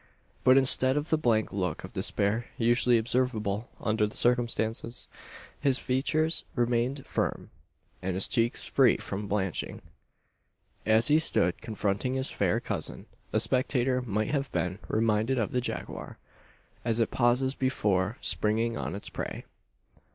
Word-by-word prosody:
But 130 +1 +6
instead 130 0 +5
of 150 +1 -2
the - - +5
blank 115 -6 +1
look 95 -3 -2
of - - -9
despair 105 +4 0
usually 120 +1 +3
observable 115 -2 -1
under 110 0 +1
the 105 - -10
circumstances, 120 -1 0 0.5
his 135 -2 +3
features 155 +6 0
remained 120 +3 0
firm, - - -3 0.5
and 95 0 -2
his 95 - +2
cheeks 115 +1 +1
free 130 -3 +4
from 100 +1 -5
blanching. 95 -2 -2 1.1
As 110 +4 +4
he 150 +2 +5
stood 90 - +2
confronting 110 +3 -2
his 130 0 +1
fair - - +1
cousin, - - -4 0.3
a - - +2
spectator 130 -1 +1
might 110 -3 -2
have 140 -2 -1
been 90 +2 -2
reminded 110 +3 +1
of 110 -4 -1
the 125 - 0
jaguar, 125 - -6 0.7
as 115 0 0
it 115 - +1
pauses 125 +2 +2
before 105 -6 0
springing 115 +2 +1
on - - -4
its 100 - -6
prey. - - -6
120 Hz, 140 wpm, -28 LUFS, 105-130 Hz, 1.1 s, But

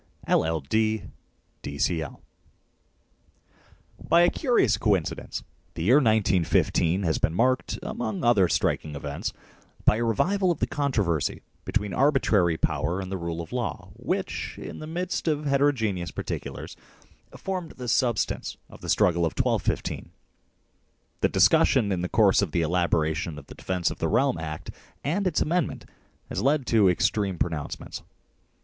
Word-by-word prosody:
LL.D., 100 +8 +1 0.6
D.C.L. 75 +2 -2 1.8
BY 170 - +4
a 175 - +5
curious 250 -5 +2
coincidence 100 -7 -1 0.3
the 80 - -3
year 120 +10 +6
1915 95 - +2
has 80 -4 +1
been 80 - +1
marked, 130 +5 +1
among 110 -3 -3
other 110 -6 +5
striking 75 -2 0
events, 70 0 -4 0.5
by 105 - +5
a 120 - 0
revival 185 - +1
of 175 - +1
the - - +1
controversy 105 - -1 0.2
between 105 -1 -1
arbitrary 110 - +3
power 85 +3 -1
and 95 -1 -5
the 95 - -2
rule 85 0 -3
of 85 - -9
law - - -3
which, - - -3
in - - -8
the 155 - -7
midst 175 +2 -3
of 150 -1 0
heterogeneous 125 - +1
particulars, - - -6 0.6
formed 185 -4 -4
the 125 -1 -7
substance 120 -1 0
of - - -13
the - - -7
struggle 85 -1 +3
of 80 - 0
1215. - - -1 1.1
The - - +2
discussion 100 -3 +4
in 90 -2 0
the 90 - -2
course 105 -3 +4
of 95 -7 -2
the 85 - +2
elaboration 80 -2 0
of 70 - -10
the - - -11
Defence 90 -3 -1
of - - -8
the - - 0
Realm - - +2
Act 75 -1 -6 0.3
and 185 +7 0
its 170 - 0
amendment 170 0 -1 0.4
has - - -2
led 140 0 +2
to 110 -6 +4
extreme 95 +1 +1
pronouncements. 80 -3 -4
100 Hz, 140 wpm, -26 LUFS, 85-135 Hz, 1.8 s, year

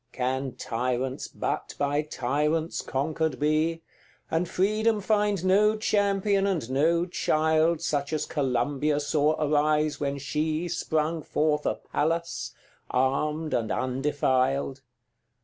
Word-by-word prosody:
XCVI. 120 +1 -49
Can 130 +1 -2
tyrants 125 +2 -2
but - - -4
by 145 +1 +1
tyrants 150 +3 -1
conquered 150 0 -1
be, 155 +2 +1 0.5
And 165 +2 0
Freedom 215 +3 +1
find 205 -2 +1
no 210 +3 +4
champion 200 -1 +1
and 170 -11 -1
no 165 +5 +2
child 160 -1 +1
Such 145 -3 -1
as 155 - -1
Columbia 145 +2 0
saw 150 +1 +1
arise 150 0 +2
when 140 -1 -1
she 155 +4 -1
Sprung 160 -1 -1
forth 150 0 0
a - - +1
Pallas, 165 +2 -2 0.4
armed 150 +5 0
and 110 -2 0
undefiled? 135 0 0
150 Hz, 115 wpm, -27 LUFS, 140-165 Hz, 0.5 s, no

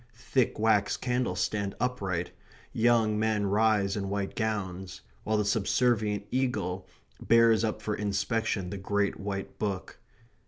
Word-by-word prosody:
Thick 125 +1 0
wax 105 -2 +2
candles 125 -7 -1
stand 100 -2 -1
upright; 95 -8 -2 0.4
young 115 -2 +3
men 110 -2 +1
rise 100 -1 +2
in 100 -2 -3
white 100 -1 -2
gowns; 95 -4 -3 0.2
while 110 0 +1
the 105 - +1
subservient 105 0 +1
eagle 110 -8 -1 0.3
bears 115 -1 +5
up 110 -1 -2
for 105 - -1
inspection 105 -1 -1
the 100 - -5
great 100 +1 0
white 100 -1 -5
book. 100 -3 -3
105 Hz, 130 wpm, -29 LUFS, 100-110 Hz, 0.4 s, bears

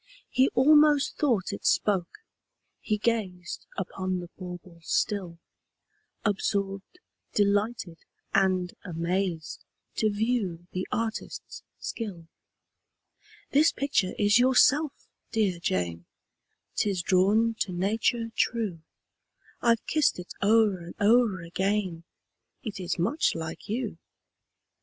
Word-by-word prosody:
He 260 +1 +4
almost 295 +2 +5
thought 230 -10 +1
it - - -7
spoke: 200 - +1 0.6
he 215 - -1
gazed 200 -6 -2
Upon 185 -1 -2
the 175 -1 -8
bauble 180 -2 -9
still, 180 0 -1 0.9
Absorbed, 200 - -1 0.4
delighted, 205 -3 +1 0.3
and 185 -2 +2
amazed, 170 -1 -2 0.3
To 215 - +3
view 205 -5 -1
the 185 0 -3
artist's 225 -1 -4 0.2
skill. 195 -8 -5 1.3
"This 300 +4 +5
picture 270 -9 0
is 205 +2 +4
yourself, 270 +4 +3 0.2
dear 200 -6 +1
Jane 85 - -2 0.7
'Tis 195 -4 0
drawn 205 +6 +3
to 190 - -1
nature 225 +5 0
true: 215 -9 0 0.8
I've 230 -1 +2
kissed 310 -2 +2
it 180 0 -8
o'er 210 -2 +4
and 170 0 -10
o'er 215 -2 +4
again, 185 -1 -1 0.6
It 215 -5 -5
is 180 0 -2
much 225 - +1
like 160 +3 -6
you." 220 -6 -3
200 Hz, 105 wpm, -27 LUFS, 180-230 Hz, 1.3 s, almost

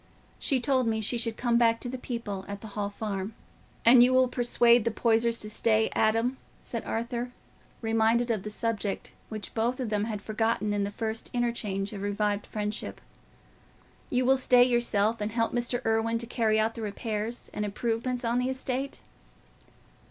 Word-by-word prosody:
She 270 -4 +1
told 260 -1 +2
me 220 -1 +1
she 225 +3 +1
should 230 -1 -1
come 240 -1 +2
back 230 -1 +3
to - - -4
the 250 - -4
people 225 -6 -4
at 200 0 -6
the 220 - -8
Hall 205 -1 -2
Farm." 205 0 -4 0.5
"And 240 +1 +8
you 255 +1 +5
will 255 0 +5
persuade 240 -1 +4
the 230 - +1
Poysers 230 +1 +2
to 215 - -2
stay, 220 0 +2
Adam?" 225 +4 +2 0.2
said 230 - -5
Arthur, 235 +2 -3 0.5
reminded 225 +2 +2
of 215 -4 -1
the 210 - -6
subject 210 -2 -3 0.2
which 215 -3 -6
both 240 +3 0
of 250 -4 -2
them 210 0 +1
had 215 -2 -3
forgotten 215 0 -1
in 205 -1 0
the - - -3
first 220 +2 -4
interchange 215 -5 -1
of 200 - -6
revived 205 0 -1
friendship. 210 0 -4 1.1
"You 250 0 +1
will 265 +1 +5
stay 250 -1 +5
yourself, 230 -3 +1
and 210 +1 -2
help 230 -1 0
Mr. 245 0 -1
Irwine 225 +1 +1
to 235 - -2
carry 225 -2 +1
out 220 +1 +1
the 230 - -7
repairs 215 +2 -4
and 210 - -2
improvements 235 +4 -2
on 235 +1 +1
the 250 +1 0
estate?" 265 +1 -3
230 Hz, 180 wpm, -28 LUFS, 215-240 Hz, 1.1 s, And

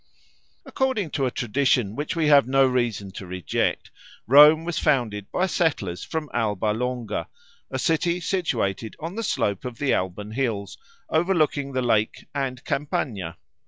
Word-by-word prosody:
According 260 - -1
to 135 -2 0
a - - +1
tradition 120 -3 +1
which 145 +6 -3
we 165 -2 +1
have 145 -4 +6
no 135 +1 +4
reason 120 -6 -1
to 95 -1 -8
reject, 90 0 -2 0.3
Rome 150 +5 +8
was 175 -1 -2
founded 115 -9 0
by 185 - +1
settlers 145 - -1
from 160 -2 -4
Alba 105 -2 0
Longa, 120 -2 -3 0.4
a - - -3
city 170 +2 +1
situated 120 - -1
on 165 +3 -5
the 225 - -3
slope 100 - -1
of 125 -2 -6
the 140 -2 +1
Alban 95 +3 -2
hills, 110 -5 -2 0.3
overlooking 155 -5 +1
the 130 0 0
lake 110 -3 +1
and 135 -3 -2
the - - -16
Campagna. 105 - -3
130 Hz, 155 wpm, -24 LUFS, 105-155 Hz, 0.4 s, Rome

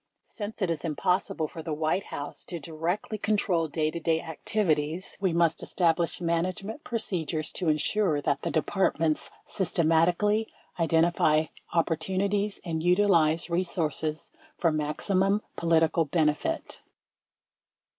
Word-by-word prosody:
Since 210 -1 -6
it 175 - +1
is 155 -4 -3
impossible 180 +1 0
for 160 - -8
tlie 155 -2 -4
White 160 +5 0
House 145 - -6
to 170 - -5
directly 165 +8 -3
control 195 -6 +1
day 155 0 -1
to 170 - -4
day 165 0 +1
activities, 160 0 -1
we 190 -3 +2
must 165 -1 +2
establish 170 -1 +1
management 185 - -2
procedures 170 -9 -2
to 175 -4 -1
ensure 155 +2 +1
that 140 0 0
the - - -2
Departments 160 -2 +1 0.2
sys 190 -4 -2
tematically 175 +7 +3 0.3
identify 160 -1 +3 0.3
opportunities 190 +5 0
and 160 -2 -2
utilize 175 -3 +3
resources 160 -3 -1 0.3
for 170 -3 +2
maximum 185 +7 +1
political 165 -1 +2
benefit. 150 -1 -1
170 Hz, 120 wpm, -28 LUFS, 155-190 Hz, 0.3 s, tematically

